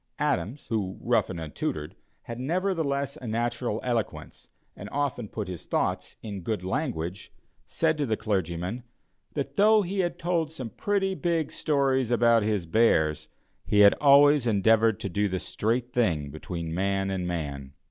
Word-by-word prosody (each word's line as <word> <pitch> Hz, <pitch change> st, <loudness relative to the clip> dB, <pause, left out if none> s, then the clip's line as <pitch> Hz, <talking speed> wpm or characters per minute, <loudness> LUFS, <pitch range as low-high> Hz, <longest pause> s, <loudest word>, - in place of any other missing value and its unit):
Adams, 110 Hz, -, -1 dB
who, 100 Hz, -5 st, -2 dB
rough -, -, +1 dB
and 90 Hz, -3 st, -5 dB
untutored, 75 Hz, -1 st, -4 dB, 0.3 s
had 115 Hz, 0 st, -7 dB
nevertheless, 150 Hz, -3 st, -1 dB
a 125 Hz, -, -8 dB
natural 120 Hz, 0 st, -1 dB
eloquence, 120 Hz, -3 st, -3 dB, 0.3 s
and 100 Hz, -, -8 dB
often 140 Hz, -5 st, -2 dB
put 105 Hz, -1 st, -5 dB
his 90 Hz, -2 st, -7 dB
thoughts -, -, -1 dB
in 100 Hz, -3 st, -5 dB
good 105 Hz, +1 st, -3 dB
language, 95 Hz, -, -3 dB, 0.4 s
said 160 Hz, -2 st, 0 dB
to 145 Hz, -, +1 dB
the 110 Hz, -1 st, 0 dB
clergyman, 95 Hz, +2 st, -2 dB, 0.5 s
that 140 Hz, -2 st, -4 dB
though 215 Hz, +1 st, +5 dB
he 195 Hz, +2 st, -3 dB
had 175 Hz, -2 st, 0 dB
told 170 Hz, -3 st, 0 dB
some 130 Hz, -8 st, -7 dB
pretty 195 Hz, -2 st, 0 dB
big 170 Hz, -4 st, -1 dB
stories 135 Hz, -5 st, +1 dB
about 120 Hz, -1 st, +4 dB
his 105 Hz, -4 st, 0 dB
bears, 80 Hz, -6 st, +2 dB, 0.4 s
he 105 Hz, -, +3 dB
had 100 Hz, 0 st, +8 dB
always 145 Hz, -2 st, +6 dB
endeavored 110 Hz, 0 st, +3 dB
to -, -, -3 dB
do 100 Hz, +2 st, 0 dB
the 95 Hz, 0 st, -2 dB
straight 120 Hz, +6 st, -2 dB
thing 80 Hz, -12 st, +1 dB
between 80 Hz, +2 st, -5 dB
man 95 Hz, +2 st, 0 dB
and 90 Hz, -2 st, -2 dB
man. 70 Hz, -5 st, -4 dB
115 Hz, 155 wpm, -27 LUFS, 95-140 Hz, 0.5 s, had